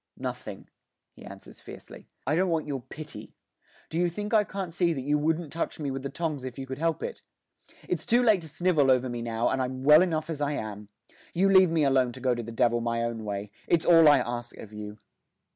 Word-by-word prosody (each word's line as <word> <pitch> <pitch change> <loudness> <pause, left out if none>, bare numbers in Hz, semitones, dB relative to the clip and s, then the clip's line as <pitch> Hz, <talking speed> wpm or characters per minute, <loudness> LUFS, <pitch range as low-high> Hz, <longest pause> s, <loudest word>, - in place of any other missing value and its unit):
'Nothing,' - - -6 0.5
he - - -15
answers - - -12
fiercely; - - -12 0.2
'I 140 - 0
don't 185 +2 +2
want 165 -2 0
your 140 -3 -4
pity. 155 +5 -10 0.6
Do 160 - -1
you 175 0 +2
think 210 +5 -5
I 215 -1 +5
can't 190 -4 -6
see 170 -1 +1
that 135 - -4
you 145 +3 +1
wouldn't 160 0 -1
touch 165 - -3
me 145 -3 -2
with 135 0 -4
the 140 - -4
tongs 150 -2 -3
if 130 -2 -7
you 135 - -5
could 130 +1 -7
help 165 0 -1
it? 480 - -5 0.7
It's - - -3
too 240 +2 +4
late 215 -6 +4
to 160 - -9
snivel 160 -4 +2
over 130 0 +3
me 120 -1 -4
now, 115 0 -1
and 130 - 0
I'm 130 0 -4
well 150 +3 +8
enough 160 -4 0
as 160 -3 -5
I 145 0 0
am. 105 -5 -6 0.5
You 190 +3 +3
leave 190 -2 +7
me 160 -2 +1
alone 130 -3 +2
to 130 - -9
go 130 -1 +1
to 120 - -3
the 115 0 -8
devil 120 0 +2
my 115 0 -1
own 115 -1 -3
way; 100 0 -4 0.2
it's 170 -2 +2
all 165 -2 +7
I 145 -1 +7
ask 120 -1 -4
of 110 - -11
you. 105 0 -8
145 Hz, 235 wpm, -27 LUFS, 120-165 Hz, 0.7 s, well